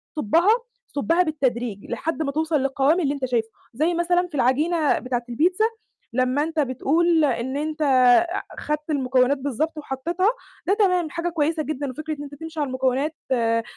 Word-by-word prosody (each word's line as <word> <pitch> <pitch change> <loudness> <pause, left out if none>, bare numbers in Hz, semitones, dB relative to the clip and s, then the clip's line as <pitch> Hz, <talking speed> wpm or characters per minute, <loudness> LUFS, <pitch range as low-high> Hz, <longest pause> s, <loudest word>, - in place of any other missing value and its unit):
تصُبَّها، 325 - +2 0.4
صُبَّها 330 +5 +1
بالتدريج 245 - -2
لحد 325 0 -2
ما 280 - -2
توصل 315 +2 -1
للقوام 275 +5 +2
اللي 285 -4 +1
أنت 275 -2 -3
شايفُه، 230 -3 -1 0.2
زي 310 +9 +1
مثلًا 350 +1 +1
في 320 - -10
العجينة 300 +5 +2
بتاعة 250 -1 -2
البيتزا، 355 - +2 0.5
لمّا 255 +3 +1
أنت 320 0 -3
بتقول 310 +5 +2
إن 260 0 -1
أنت 310 +1 -3
أع 275 +7 +4 0.2
خدت 300 +1 -3
المكونات 265 -1 +2
بالضبط 285 +4 -2
وحطيتها، 335 +7 -1 0.4
ده 390 - +4
تمام 365 -6 +2
حاجة 340 +2 -2
كويسة 320 -1 0
جدًا، 290 -2 -3
وفكرة 310 +4 -5
إن 290 - -7
أنت 285 0 -9
تمشي 320 +1 -8
على 290 - 0
المكونات 260 +4 0 0.2
آآ، 230 -2 +2
295 Hz, 165 wpm, -23 LUFS, 260-325 Hz, 0.5 s, أع